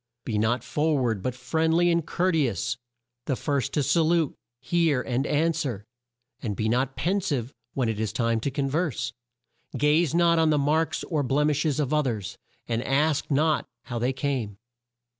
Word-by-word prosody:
"Be 110 -3 -1
not 115 +2 +1
for 150 0 +1
ward, 115 -6 0
but 125 +3 -2
friendly 160 +7 +2
and 170 -1 +2
court 180 +2 0
e 150 -4 +3
ous; 110 - -2 0.5
the 135 - +1
first 140 -2 -1
to 150 - +1
sa 165 +5 +3
lute, 165 -2 +2 0.3
hear, 160 +1 +2
and 130 +2 -1
an 160 +3 +2
swer; 135 -11 -3 0.6
and 105 -4 -3
be 110 - -1
not 125 +3 0
pen 180 +10 0
sive 140 - -2 0.2
when 130 -3 +1
it 110 -2 -2
is 110 -2 -1
time 115 0 0
to 130 - -1
con 135 +1 -1
verse. 155 -1 -1 0.6
"Gaze 150 +2 +3
not 170 -1 +4
on 160 -1 +4
the 150 - +3
marks 155 +3 +1
or 150 -4 -1
blem 145 +3 +2
ish 150 +2 0
es 150 - 0
of 150 -1 0
o 150 - +4
thers, 110 - -3 0.3
and 115 0 -1
ask 145 +2 +1
not 155 +2 +2 0.2
how 120 -2 -4
they 125 +3 +1
came. 130 -7 -2
140 Hz, 195 wpm, -26 LUFS, 125-160 Hz, 0.6 s, not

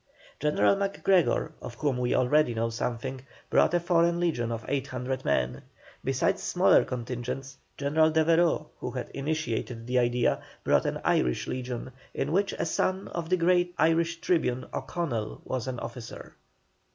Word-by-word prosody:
General 150 +6 +3
MacGregor, 195 -2 +1
of 120 - -7
whom 140 -2 -1
we 125 0 +1
already 130 -1 +3
know 115 +1 0
something, 125 +3 -3 0.3
brought 175 - +4
a - - +4
foreign 170 0 +2
legion 135 -10 0
of 115 -1 -4
800 130 -2 -2
men. 65 -2 0 0.4
Besides - - +1
smaller - - +4
contingents, 125 +2 -5 0.2
General 155 +3 +3
Devereux, 160 0 +3
who - - -4
had 125 -1 -5
initiated 130 -5 -3
the 125 +1 +2
idea, 120 0 +2 0.2
brought - - +3
an - - -2
Irish 60 -1 +2
legion, 125 0 -4 0.2
in 145 - -1
which 195 +3 +2
a - - -2
son 185 +4 -1
of 170 -1 -4
the 185 - +3
great 175 0 +2
Irish 165 +1 +2
Tribune, 130 -8 +1
O'Connell, 120 -11 -3
was 130 -1 -3
an 125 -2 -3
officer. 115 0 -8
135 Hz, 150 wpm, -28 LUFS, 120-165 Hz, 0.4 s, brought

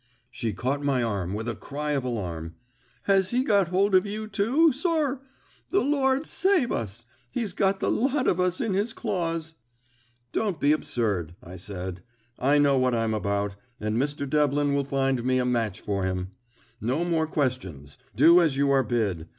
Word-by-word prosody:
She 115 -2 -3
caught 130 +9 -2
my 135 -3 +1
arm 100 -4 -2
with 110 +2 -4
a 120 - -1
cry 150 +5 -5
of 140 -3 0
alarm. 85 -9 -4 0.5
"Has 195 -2 +3
he 250 +2 +1
got 200 -8 +3
hold 195 +3 +1
of 185 -1 +6
you, 215 +1 -4
too, 240 +11 +3
sir? 290 -3 0 0.5
The 395 - +2
Lord 275 0 +1
save 370 -10 +2
us! 115 +1 -4 0.3
He's 220 -6 -2
got 195 +1 +1
the - - 0
lot 270 +2 +1
of 180 - +2
us 180 0 +1
in 225 -4 -1
his 205 +4 0
claws!" 165 -7 -3 0.8
"Don't 200 -8 -1
be 145 - +3
absurd," 100 - -1
I 90 +2 -10
said. 90 -1 -6 0.4
"I 140 +3 +3
know 140 -2 +4
what 130 -1 +2
I'm 115 -1 0
about, 100 -1 -1 0.2
and 105 0 -2
Mr. 140 +3 -1
Devlin 145 0 +2
will 140 -1 +1
find 135 -2 0
me 130 +1 +2
a 125 - +1
match 115 -5 -1
for 100 -2 -2
him. 95 0 -2 0.5
No 130 +10 0
more 165 -2 +1
questions; 110 - -3 0.2
do 165 +8 +7
as 155 -5 +1
you 140 0 +2
are 135 -1 +4
bid. 105 -9 -1
140 Hz, 180 wpm, -26 LUFS, -, 0.8 s, do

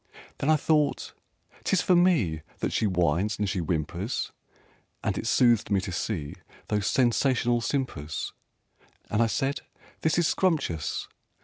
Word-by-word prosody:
Then 140 - 0
I 155 - +6
thought 150 -1 +1 0.5
"'Tis 190 - +2
for 180 - +4
me 150 - +3 0.2
That - - -2
she 110 - +2
whines 90 +3 +1
and 105 - 0
she 95 0 -1
whimpers!" 85 - -2 0.7
And - - 0
it - - -3
soothed 120 -3 +4
me 100 - +3
to 95 0 -5
see 80 -4 -3 0.4
Those 105 -1 0
sensational 120 -1 +2
simpers, 115 - -3 0.8
And 105 - +2
I 115 - +4
said 135 +5 -1 0.4
"This 160 0 +2
is 175 - +3
scrumptious!" 145 - 0
110 Hz, 140 wpm, -27 LUFS, 90-140 Hz, 0.8 s, I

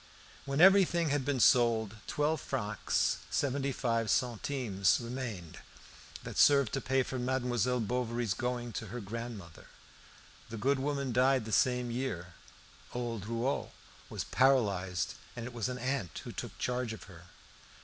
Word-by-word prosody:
When 140 +1 -2
everything 180 -3 +6
had 140 -1 +1
been 135 -1 -1
sold, 115 -3 +4
twelve 150 0 0
francs 105 0 -1
seventy 140 0 0
five 115 -3 0
centimes 120 -5 +1
remained, 115 -9 -6 0.6
that - - -5
served 140 -4 +5
to 135 - -1
pay 130 +1 +1
for 130 +1 -4
Mademoiselle 125 -1 0
Bovary's 120 -1 -1
going 120 +2 -3
to 110 - -4
her 120 +5 -6
grandmother. 110 -5 -7 0.8
The 115 - -6
good 135 +6 +1
woman 140 -2 -1
died 130 0 +3
the 110 - -6
same 125 +2 +2
year; 90 -9 -4 0.6
old 115 -4 -4
Rouault 115 +4 -2 0.4
was - - -3
paralysed, 100 -9 +2 0.2
and 120 -1 -5
it 125 - -7
was 120 +1 -2
an 125 - -4
aunt 130 -8 -2
who - - -7
took - - -7
charge 125 -2 -2
of 110 - -9
her. 85 -3 -14
125 Hz, 145 wpm, -32 LUFS, 110-130 Hz, 0.8 s, everything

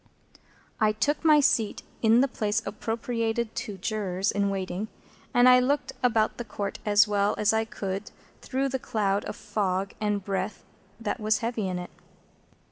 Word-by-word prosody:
I 215 -1 +3
took 290 +9 0
my 305 -2 +6
seat 225 -6 +1 0.2
in 225 +2 +5
the 275 - +3
place 220 -2 -1
appropriated 225 +2 -2
to 220 -4 -5
Jurors 195 -1 -1
in 200 -1 +1
waiting, 195 +1 -3 0.4
and 245 +1 +5
I 250 0 +8
looked 280 +3 0
about 225 -3 +2
the - - -2
Court 205 -3 -5
as 205 +1 +6
well 205 0 +1
as 210 +1 +3
I 220 0 +1
could 200 0 -4 0.3
through 270 +1 -1
the 265 0 -2
cloud 205 -4 0
of - - -5
fog 195 -2 -2
and 205 -2 0
breath 195 +1 -3 0.4
that 230 +2 -3
was 215 0 +2
heavy 230 -4 -1
in 185 -1 -2
it. 180 0 -7
215 Hz, 165 wpm, -27 LUFS, 200-235 Hz, 0.4 s, I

